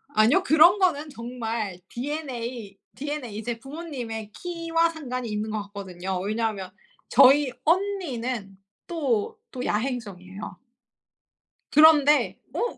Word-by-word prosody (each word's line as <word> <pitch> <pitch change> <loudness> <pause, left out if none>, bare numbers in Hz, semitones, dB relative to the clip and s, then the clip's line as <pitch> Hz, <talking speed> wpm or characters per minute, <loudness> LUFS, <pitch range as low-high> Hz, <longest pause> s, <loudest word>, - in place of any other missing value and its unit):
아니요. 240 - +5
그런 340 +2 +6
거는 315 -5 +1
정말 230 -6 -4
DNA 245 -6 -5 0.2
DNA 270 -5 -5
이제 230 +1 -4
부모님의 255 -7 -6
키와 335 -1 0
상관이 255 -7 -5
있는 210 +1 -2
것 215 -1 -2
같거든요. 190 -2 -5
왜냐하면 205 -2 -2 0.4
저희 275 +1 +6
언니는 260 - -1 0.3
또 310 - -1
또 250 -1 -5
야행성이에요. 210 -5 -4 1.1
그런데 300 -1 +6
어 480 - -2
250 Hz, 255 characters per minute, -25 LUFS, 215-305 Hz, 1.1 s, 그런